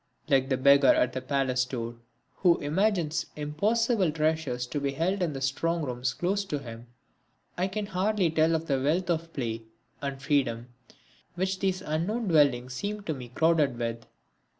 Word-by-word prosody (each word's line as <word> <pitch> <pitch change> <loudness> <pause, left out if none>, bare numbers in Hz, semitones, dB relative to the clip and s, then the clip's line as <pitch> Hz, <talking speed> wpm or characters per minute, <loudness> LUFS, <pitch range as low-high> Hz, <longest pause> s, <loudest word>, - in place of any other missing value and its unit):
Like 135 -1 +2
the 130 - +1
beggar 140 0 +6
at 125 - +1
the 130 - -3
palace 130 -1 +1
door 120 -2 -5 0.4
who 175 -3 +4
imagines 165 0 0
impossible 200 +6 +1
treasures 155 -5 -1
to 145 +4 -3
be 140 -1 -1
held 185 +7 0
in 170 -4 0
the 135 - -6
strong 165 +5 0
rooms 125 -2 -2
closed 195 - -1
to 150 - -1
him, 120 -3 -9 0.7
I 180 +2 0
can 205 +2 -3
hardly 195 -2 +1
tell 160 +1 +3
of 160 0 -2
the 135 -4 0
wealth 170 +6 +1
of 165 0 -2
play 115 -6 -3 0.4
and 140 -1 -4
freedom 130 -4 0 0.7
which 190 +1 -1
these 190 -1 -1
unknown 190 +9 -1
dwellings 130 -6 +3
seem 205 +8 -4
to 160 - -2
me 125 -4 -8
crowded 150 -1 +2
with. 115 -1 -4
150 Hz, 170 wpm, -28 LUFS, 130-180 Hz, 0.7 s, beggar